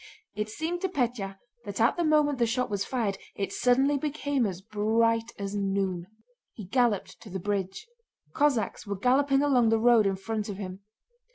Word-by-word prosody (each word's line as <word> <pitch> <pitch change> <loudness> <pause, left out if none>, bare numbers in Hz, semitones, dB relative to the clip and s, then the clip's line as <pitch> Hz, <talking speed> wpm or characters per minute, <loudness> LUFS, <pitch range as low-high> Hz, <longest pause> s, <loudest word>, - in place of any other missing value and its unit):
It 210 0 -2
seemed 325 +9 -3
to 380 - 0
Pétya 235 - -2 0.3
that 205 -1 -6
at 230 - +4
the 345 - 0
moment 300 -3 +3
the 235 - +3
shot 245 0 -1
was 200 -1 0
fired 210 -6 -2 0.2
it 195 - -3
suddenly 270 +3 +3
became 285 -4 0
as 185 -2 -5
bright 225 +3 +1
as 200 0 -4
noon. 195 -3 -1 0.5
He 210 - -8
galloped 235 -1 0
to 215 - -11
the 190 - -4
bridge. 195 - -3 0.5
Cossacks 275 -8 0
were 200 -1 -3
galloping 270 +5 +3
along 250 -5 +4
the 225 - +3
road 230 -2 +5
in 195 - 0
front 215 +2 -4
of 200 - -5
him. 190 -2 -6
225 Hz, 180 wpm, -28 LUFS, 200-265 Hz, 0.5 s, road